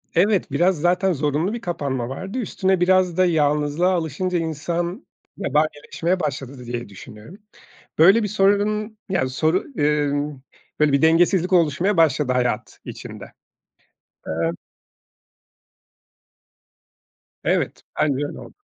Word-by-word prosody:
evet, 200 +3 +2
biraz 175 -2 +2
zaten 180 +1 +2
zorunlu 150 - -1
bir 235 - -5
kapanma 135 - -3
vardı. 190 - -6
Üstüne 190 -5 0
biraz 185 -1 +3
da 185 - +4
yalnızlığa 150 +1 +1
alışınca 175 +2 -1
insan 170 +3 -3 0.3
yabanileşmeye 155 +3 -1
başladı 140 -3 -4
dı 125 - -11
diye 120 -2 -5
düşünüyorum. 110 - -12 0.6
Böyle 195 +8 +6
bir 210 - -1
sorunun 210 +2 +1
ya 175 -9 0
soru 160 +7 0
eee, 145 -1 +1 0.7
böyle 150 -2 +4
bir 140 - +2
dengesizlik 175 +3 +3
oluşmaya 170 +3 +2
başladı 150 -5 +3
hayat 125 -3 -2
içinde. - - -9 1.0
Eee 80 +1 -1 2.9
Evet, - - 0 0.2
bence 150 -3 +2
öyle - - -7
oldu. - - -12
165 Hz, 115 wpm, -22 LUFS, 145-185 Hz, 2.9 s, Böyle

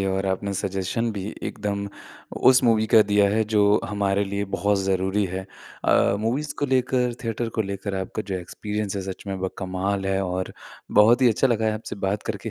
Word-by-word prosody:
है 95 - 0
और 95 +1 -1
आपने 95 +1 -1
सजेशन 95 +4 -1
भी 100 -2 -5 0.2
एकदम 100 -1 -3 0.6
उस 130 0 +4
मूवी 110 -2 +3
का 110 - +9
दिया 100 0 +4
है, 110 +1 +2
जो 105 -1 +3
हमारे 100 -1 0
लिए 100 +1 -2
बहुत 100 0 +1
ज़रूरी 95 +1 0
है। 95 0 -4 0.4
अ, - - +3
मूवीज़ 135 +7 -1
को 145 - 0
लेकर, 125 -2 +1
थिएटर 115 +1 -2
को - - +4
लेकर 100 0 -4
आपका 95 +3 -4
जो 95 - -2
एक्सपीरियंस 105 +3 -4
है, 95 - -2
सच - - -15
में 95 - -3
वो 95 0 -2
कमाल 95 +1 -2
है 95 0 +1
और 90 +1 -3 0.5
बहुत 120 +5 +5
ही 125 - +7
अच्छा 115 +4 +3
लगा 115 -3 +1
है 110 - +2
आपसे 110 -1 -6
बात 100 +2 -1
करके। 105 +2 -5
100 Hz, 200 wpm, -24 LUFS, 95-110 Hz, 0.6 s, का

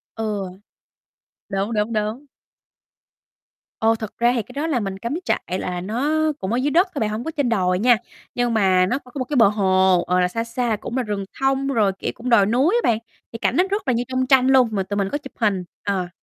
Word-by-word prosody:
Ừ. 215 -3 -2 1.0
Đúng, 195 +2 -2
đúng, 210 +2 0
đúng. 215 +6 -2 1.5
Ồ, 225 0 +3
thật 220 -2 -7
ra 240 +1 +3
thì 235 - +1
cái 250 - -13
đó 290 +4 -2
là 290 -6 +1
mình 195 -3 -4
cắm 235 +5 -3
trại 185 +1 -1
là 180 -1 -3
nó 250 - -1 0.2
cũng 190 +4 -3
ở - - +1
dưới 275 +3 0
đất 355 +6 +4
thôi - - -1
bạn, 215 -3 0
hổng 215 +2 -4
có 320 - -4
trên 285 -5 -1
đồi 185 -5 +1
nha. 240 +2 +5 0.4
Nhưng 245 -1 0
mà 190 -4 +3
nó 250 +8 -1
c - - -32
có 250 - -17
một 255 - -1
cái 290 +3 -3
bờ 230 - +7
hồ, 190 -3 +3
ờ, 180 0 +2
là 180 - +3
xa 230 +5 -3
xa 235 -1 -1
cũng 240 - -4
là 255 - +1
rừng 205 -2 -3
thông, 270 0 +1
rồi, 220 -7 +2
kiểu, - - -2
cũng 250 +2 -5
đồi 220 -5 +5
núi 260 - +2
á - - +1
bạn, 220 - 0 0.3
thì 230 - -6
cảnh 235 - 0
nó 360 - +4
rất 400 -4 -2
là 255 - +3
như 235 +1 0
trong 260 0 -1
tranh 260 -1 +5
luôn, 260 -3 +5
mà 200 -3 -1
tụi 205 +2 -4
mình 195 -1 0
có - - 0
chụp 270 -2 -12
hình, 205 -5 +1 0.2
ờ. 190 -3 -1
230 Hz, 250 wpm, -22 LUFS, 200-255 Hz, 1.5 s, bờ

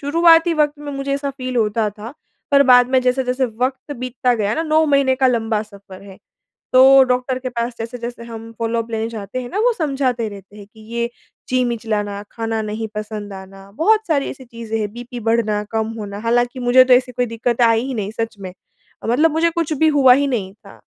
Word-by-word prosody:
शुरुआती 330 +3 +4
वक़्त 300 -1 +1
में 290 -1 -7
मुझे 275 0 -3
ऐसा 280 0 -3
फ़ील 255 -2 -5
होता 215 -1 +1
था, 210 +4 -10 0.4
पर 280 -1 +6
बाद 245 0 +7
में 260 -1 +4
जैसे-जैसे 255 +1 0
वक़्त 255 +5 -3
बीतता 250 0 -1
गया 210 -1 -1
ना, 325 - -1
9 315 0 +2
महीने 275 -2 +3
का 265 0 +3
लंबा 225 -3 0
सफर 200 -3 -14
है। 195 -1 -13 0.6
तो 255 - +7 0.2
डॉक्टर 255 0 -1
के 255 0 -4
पास 240 0 -3
जैसे-जैसे 235 +1 -6
हम 230 -1 -9
फॉलो-अप 230 0 -2
लेने 225 0 -2
जाते 220 +2 -6
हैं 245 - -8
ना 400 - -3
वो 485 +3 +3
समझाते 270 - -1
रहते 200 0 -13
हैं 205 - -11
कि 220 - -18 0.2
ये 235 0 -1 0.4
जी 255 0 +2
मिचलाना, 215 -4 -3
खाना 225 -1 -3
नहीं 215 +1 -4
पसंद 210 -1 -6
आना, 195 0 -12
बहुत 425 - +2
सारी 290 -4 0
ऐसी 265 -2 -10
चीज़ें 230 -2 -5
हैं 210 -1 -3
बीपी 245 +1 -8
बढ़ना, 215 -2 +1
कम 220 -1 -1
होना, 205 -2 -6
हालाँकि 245 +3 0
मुझे 250 +1 +6
तो 255 0 +4
ऐसी 250 0 +3
कोई 250 0 -1
दिक्कतें 235 +1 0
आई 230 0 +3
ही 270 - -4
नहीं 210 -3 -3
सच 225 0 -3
में। 185 -2 -8 0.5
मतलब 295 +7 +3
मुझे 325 +2 +2
कुछ 330 -2 -2
भी 315 +2 +2
हुआ 265 -3 +7
ही 280 +2 +2
नहीं 205 -8 -3
था। 215 - -17
240 Hz, 210 wpm, -19 LUFS, 220-265 Hz, 0.6 s, बाद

